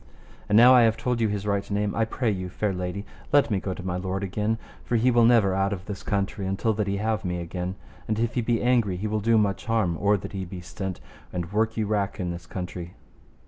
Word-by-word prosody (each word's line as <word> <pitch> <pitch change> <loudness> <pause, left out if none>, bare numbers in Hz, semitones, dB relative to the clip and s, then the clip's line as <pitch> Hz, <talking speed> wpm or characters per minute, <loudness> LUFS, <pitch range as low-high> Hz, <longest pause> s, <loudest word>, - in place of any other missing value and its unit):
And 105 - +3
now 125 +3 +9
I 125 - +7
have 115 -1 +3
told 125 -2 -1
you 110 - +3
his 105 -1 -3
right 100 -1 -1
name, 105 0 0
I 115 - +1
pray 115 0 -1
you, 90 -2 -3
fair 100 +2 -1
lady, 90 +3 -4 0.3
let 145 -4 +4
me 100 - +2
go 95 -1 -4
to 90 - -8
my 90 -1 -1
lord 95 +1 -3
again, 105 +3 -1 0.3
for 120 - -1
he 120 +3 +4
will 120 -1 +5
never 115 -5 +5
out 95 +1 +1
of 90 -2 -6
this 100 -2 -6
country 100 -1 -2
until 100 +4 0
that 105 -1 -1
he 100 0 0
have 110 +1 -1
me 90 -1 -2
again. 90 +2 -4 0.3
And 110 - 0
if 115 +1 0
he 125 - +1
be 115 0 0
angry 120 -7 +2
he 100 - -4
will 110 0 0
do 115 +2 +3
much 100 -2 +1
harm 110 -7 +1
or 100 0 +4
that - - -7
he 95 -1 -3
be 90 0 -7
stint, 95 +1 -5 0.3
and 90 +1 -4
work 110 +2 +1
you 110 - +1
wrack 105 0 -1
in 90 -2 -2
this 85 0 -8
country. 90 -1 -6
100 Hz, 255 wpm, -26 LUFS, 95-110 Hz, 0.3 s, now